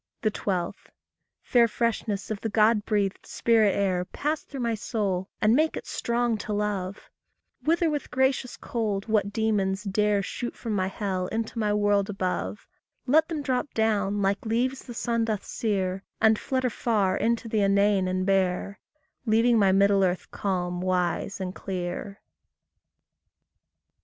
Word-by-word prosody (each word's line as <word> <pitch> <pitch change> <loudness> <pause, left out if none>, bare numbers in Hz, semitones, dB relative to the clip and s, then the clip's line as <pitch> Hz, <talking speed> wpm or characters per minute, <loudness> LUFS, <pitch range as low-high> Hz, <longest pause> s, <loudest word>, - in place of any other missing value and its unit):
12. 195 -4 -2 0.6
Fair 240 -2 +4
freshness 220 -2 -2
of 210 - -3
the 225 - -2
God 215 0 +3
breathed 200 -3 0
spirit 220 -4 +2
air, 185 -3 +1
Pass 300 +11 -2
through 275 -3 -7
my 235 -1 0
soul, 200 -4 -2
and 215 +2 +4
make 310 +3 +2
it - - -6
strong 235 -1 0
to 215 - -5
love; 205 -2 -3 0.5
Wither 335 +2 +2
with 295 -2 -2
gracious 265 -1 0
cold 210 -4 -2
what 210 -2 +1
demons 205 -3 0
dare 205 0 +1
Shoot 240 +5 -5
from 225 -3 -4
my 185 -2 +1
hell 190 -2 -2
into 225 +2 -3
my 210 -2 +1
world 205 -1 +2
above; 180 - -3 0.4
Let 310 +5 +4
them 310 -4 -3
drop 260 +1 -1
down, 205 -2 +1
like 195 +1 +1
leaves 245 +4 0
the 240 - -9
sun 230 -1 0
doth 215 -3 -2
sear, 195 -3 -1 0.2
And 220 -1 +4
flutter 260 -2 -1
far 205 -5 +1
into 230 +1 0
the 220 -1 +1
inane 200 -1 +3
and 185 0 -1
bare, 195 0 0 0.5
Leaving 225 +1 +4
my 195 -2 +5
middle 195 0 +4
earth 180 -1 -1
calm, 180 -2 -2
wise, 180 +1 -1
and 185 -1 -4
clear. 190 +2 -5
210 Hz, 150 wpm, -26 LUFS, 195-230 Hz, 0.6 s, my